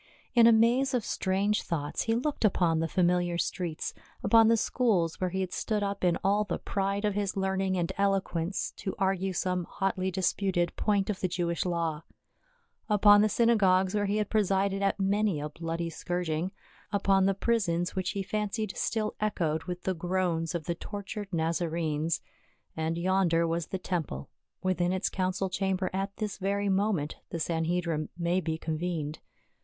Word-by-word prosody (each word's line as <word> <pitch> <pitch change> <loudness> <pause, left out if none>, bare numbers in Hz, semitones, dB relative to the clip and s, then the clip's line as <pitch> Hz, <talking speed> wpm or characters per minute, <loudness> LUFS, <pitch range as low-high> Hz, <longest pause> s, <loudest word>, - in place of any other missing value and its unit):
In 235 -2 +7
a - - +8
maze 245 +4 +4
of 235 - -1
strange 200 +3 0
thoughts 145 -3 -2
he 225 - +2
looked 275 +3 -1
upon 175 -6 +3
the 165 - 0
familiar 175 0 +1
streets, 175 -2 -2 0.3
upon 225 +2 +6
the 230 0 +5
schools 200 -10 +1
where 185 - +1
he 190 +2 -2
had 185 -1 -3
stood 210 -2 -1
up 200 -1 -3
in 175 -2 +3
all 200 +2 +3
the 195 -4 -3
pride 200 +1 -1
of 210 - +1
his 200 -1 -2
learning 190 0 0
and 170 -1 0
eloquence 195 -2 0
to 190 - -4
argue 190 0 0
some 180 -1 -1
hotly 190 0 -1
disputed 185 -1 0
point 205 -1 +1
of 195 - -6
the 185 - 0
Jewish 170 -1 -1
law; 165 -3 -1 0.9
upon 205 0 +7
the 215 - +3
synagogues 195 -5 +3
where 205 -1 +1
he 205 +2 0
had 210 -2 -1
presided 195 -2 +1
at 200 0 +1
many 200 -3 +1
a 150 +1 -4
bloody 165 +2 -4
scourging; 175 +1 -2 0.4
upon 195 -1 +3
the 195 - +2
prisons 185 -6 0
which 185 -1 -1
he 200 - -2
fancied 210 +1 -2
still 215 -2 -1
echoed 160 -7 0
with 180 -1 -5
the 190 - 0
groans 175 -1 -1
of 170 - -2
the 170 - -1
tortured 200 +2 -6
Nazarenes; 165 -1 -1 0.5
and 160 +1 -1
yonder 175 -2 +2
was 165 0 -1
the 190 - -3
tem 180 -1 -1
ple, 70 - -8 0.3
within 180 -1 +1
its 190 0 0
council 185 0 -1
chamber 190 0 -1
at 195 +1 -3
this 210 -3 -4
very 200 +1 0
moment 190 -6 0
the 170 - -4
Sanhedrim 165 -1 -1
may 175 +1 +1
be 160 -2 -2
convened. 160 -1 -3
185 Hz, 170 wpm, -29 LUFS, 170-200 Hz, 0.9 s, a